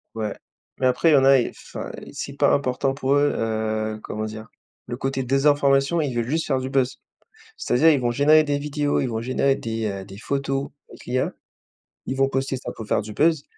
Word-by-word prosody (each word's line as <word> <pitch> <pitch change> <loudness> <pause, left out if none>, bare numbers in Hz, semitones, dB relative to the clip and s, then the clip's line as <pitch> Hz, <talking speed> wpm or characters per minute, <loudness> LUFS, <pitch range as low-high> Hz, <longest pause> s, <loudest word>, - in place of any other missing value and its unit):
Ouais 110 -2 -3 0.4
mais 130 - +3
après 130 +6 +3
il - - +5
y - - +7
en 135 - +4
a 135 0 +7
ils 120 - -1
enfin, - - -8 0.2
c'est - - -5
pas - - +4
important 135 0 0
pour 135 0 0
eux, 145 0 +3
heu, 110 -1 -2
comment 110 0 -4
dire? 110 +1 -7 0.4
Le 120 - -5
côté 135 0 -2
désinformation, 140 +3 +3
ils 140 -5 -2
veulent 120 -1 -1
juste 160 +5 -1
faire 135 -2 +1
du 130 0 -4
buzz. 130 -1 0 0.6
C'est-à-dire, 155 +7 +3
ils 145 -4 +3
vont 120 -1 0
générer 150 +5 +5
des 145 -1 0
vidéos, 145 0 -1
ils - - 0
vont 110 -1 -3
générer 130 +3 +1
des, 115 -3 -3
heu, 100 -2 -4
des 95 0 -12
photos 135 +3 -2 0.2
avec - - -14
l'IA. 130 +1 0 0.7
Ils 130 - -3
vont 135 0 +3
poster 135 0 -1
ça 130 - -6
pour 110 - -7
faire 105 - +1
du 105 +1 -8
buzz 155 +4 +2
135 Hz, 215 wpm, -23 LUFS, 115-140 Hz, 0.7 s, y